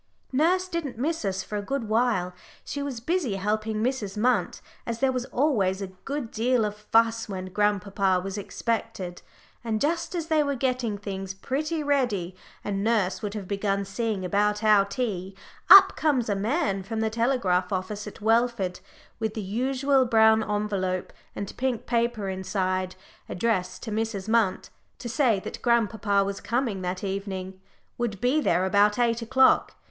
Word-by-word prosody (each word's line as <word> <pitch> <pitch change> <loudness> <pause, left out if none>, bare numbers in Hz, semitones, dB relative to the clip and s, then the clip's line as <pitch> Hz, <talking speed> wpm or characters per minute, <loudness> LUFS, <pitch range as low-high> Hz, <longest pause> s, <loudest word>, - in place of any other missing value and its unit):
Nurse 350 +7 +2
didn't 335 -9 -4
miss 315 +5 -1
us 190 -1 -1
for 210 +2 -4
a - - -3
good 255 +2 -3
while; 215 -5 +1 0.3
she 285 - -4
was 280 -4 -4
busy 290 - -1
helping 215 +2 -1
Mrs. 230 -6 -2
Munt, 230 -4 +1 0.2
as 230 -1 -4
there 270 -1 +3
was 250 -1 -2
always 220 -11 +1
a 195 - -3 0.2
good 280 -5 -4
deal 240 0 +1
of 210 0 -3
fuss 225 +1 +1
when 185 -1 -6
grandpapa 200 -2 +1
was 195 +1 -5
expected. 205 -3 -3 0.4
And 220 -2 -1
just 335 +5 -1
as 335 -2 -2
they 315 -2 +2
were 285 -1 0
getting 250 -4 -1
things 195 -2 -5
pretty 305 +9 -2
ready, 240 -11 0 0.3
and 200 -1 -2
nurse 195 -5 +1
would 210 0 -4
have 200 -3 -5
begun 200 0 -1
seeing 200 -1 -2
about 210 +3 +1
our 210 -2 +5
tea, 200 -3 -3 0.3
up 390 0 +10
comes 270 -8 +1
a 205 - +1
man 210 - 0
from 220 +3 -4
the 220 0 0
telegraph 220 -7 +1
office 200 +2 -3
at 210 - -10
Welford 225 -4 +1 0.4
with 220 -2 -2
the 215 - -3
usual 260 +6 +1
brown 220 -1 +5
envelope 205 -4 -2 0.2
and 200 - -5
pink 255 -3 -1
paper 235 -3 0
inside, 185 -1 -2 0.3
addressed 185 -3 -1
to 225 - -5
Mrs. 215 -2 -2
Munt, 220 -4 +1 0.3
to 240 - -7
say 235 -4 +2
that - - -7
grandpapa 220 -4 +2
was 195 0 -4
coming 235 -5 -1
that 180 +1 -3
evening, 190 -1 -4 0.4
would 220 -5 -2
be 260 +7 +2
there 180 -7 +2
about 205 +3 +3
eight 235 -1 +1
o'clock. 260 +3 +3
215 Hz, 165 wpm, -26 LUFS, 195-245 Hz, 0.4 s, up